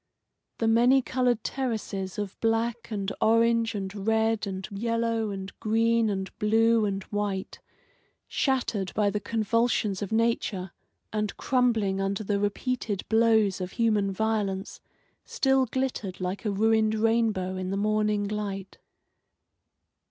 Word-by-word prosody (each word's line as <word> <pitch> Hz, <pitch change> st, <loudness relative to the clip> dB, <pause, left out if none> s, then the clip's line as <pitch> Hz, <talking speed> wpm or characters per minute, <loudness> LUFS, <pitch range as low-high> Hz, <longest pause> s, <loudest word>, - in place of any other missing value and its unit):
The 225 Hz, -, 0 dB
many 245 Hz, +4 st, +5 dB
coloured 245 Hz, -4 st, 0 dB
terraces 215 Hz, -7 st, -3 dB
of 205 Hz, -2 st, -4 dB
black 230 Hz, +1 st, 0 dB
and 205 Hz, -3 st, -3 dB
orange 230 Hz, 0 st, +3 dB
and 195 Hz, +1 st, -5 dB
red 220 Hz, -1 st, +2 dB
and 190 Hz, -1 st, -5 dB
yellow 230 Hz, +1 st, -1 dB
and 195 Hz, -1 st, -5 dB
green 230 Hz, 0 st, +2 dB
and 190 Hz, -2 st, -4 dB
blue 225 Hz, +1 st, +3 dB
and 195 Hz, -1 st, -2 dB
white, 205 Hz, -2 st, -3 dB, 0.7 s
shattered 240 Hz, -8 st, 0 dB
by 205 Hz, -1 st, +2 dB
the 210 Hz, -, -1 dB
convulsions 220 Hz, -1 st, 0 dB
of 205 Hz, -, -4 dB
nature, 220 Hz, -5 st, 0 dB, 0.4 s
and 210 Hz, -1 st, -2 dB
crumbling 225 Hz, -7 st, +1 dB
under 195 Hz, +2 st, -1 dB
the 205 Hz, 0 st, 0 dB
repeated 205 Hz, 0 st, -2 dB
blows 220 Hz, -4 st, +3 dB
of 180 Hz, 0 st, -5 dB
human 215 Hz, -4 st, +1 dB
violence, 200 Hz, -2 st, -2 dB, 0.4 s
still 265 Hz, -1 st, +2 dB
glittered 235 Hz, -7 st, -3 dB
like 185 Hz, +4 st, -4 dB
a 210 Hz, -, +1 dB
ruined 220 Hz, +1 st, +2 dB
rainbow 220 Hz, -4 st, +1 dB
in 185 Hz, 0 st, -3 dB
the 195 Hz, -, -1 dB
morning 210 Hz, 0 st, +1 dB
light. 200 Hz, -2 st, -5 dB
215 Hz, 130 wpm, -27 LUFS, 195-230 Hz, 0.7 s, many